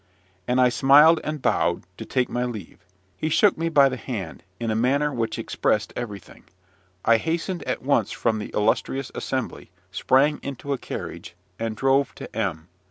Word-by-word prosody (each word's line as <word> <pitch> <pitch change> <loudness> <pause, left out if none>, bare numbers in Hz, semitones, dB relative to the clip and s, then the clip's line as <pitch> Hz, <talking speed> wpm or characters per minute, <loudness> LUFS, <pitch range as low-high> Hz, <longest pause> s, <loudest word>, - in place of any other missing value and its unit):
And 125 +1 +2
I 125 -1 +5
smiled 145 +6 +6
and 150 -3 -4
bowed, - - +1
to - - -7
take 125 -1 0
my 125 - -2
leave. 110 -8 -7 0.3
He 155 - -2
shook 200 +5 +4
me 165 +1 -1
by 140 -4 +6
the 130 -1 -3
hand, 105 -11 -6 0.2
in 115 -1 -1
a - - 0
manner 140 +6 +1
which 115 -3 -2
expressed 110 -1 -1
everything. 105 -6 -8 0.6
I 115 0 +6
hastened 170 - -2
at - - -3
once 140 +2 +2
from 110 -2 -1
the 105 - -6
illustrious 115 +5 0
assembly, - - -4 0.2
sprang 135 +10 +2
into 140 +1 -4
a 135 - -3
carriage, 85 - -7 0.2
and 115 -1 -2
drove 135 +2 +2
to - - -10
M 90 -7 -2
125 Hz, 170 wpm, -24 LUFS, 110-140 Hz, 0.6 s, smiled